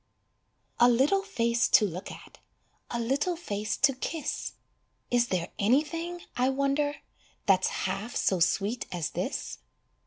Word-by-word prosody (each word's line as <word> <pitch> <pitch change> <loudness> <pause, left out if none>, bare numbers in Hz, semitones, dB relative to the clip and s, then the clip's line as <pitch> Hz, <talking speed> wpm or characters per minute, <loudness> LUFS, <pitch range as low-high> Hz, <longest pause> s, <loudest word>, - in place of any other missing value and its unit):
A 240 +1 +7
little 270 +11 +3
face 235 - +1
to 230 -5 +5
look 180 0 -5
at, - - -13 0.5
A 235 - -2
little 275 +9 0
face 215 -10 -3
to 275 - +4
kiss; 300 +4 -4 0.6
Is 240 -1 +3
there 180 -5 -1
anything, 330 +10 +1
I 250 +2 +2
wonder, 275 +2 +1 0.5
That's 190 -3 +4 0.2
half 200 +5 -3
so 190 - +2
sweet 205 +7 +1
as 170 -4 -2
this? - - -3
245 Hz, 130 wpm, -28 LUFS, 205-290 Hz, 0.6 s, A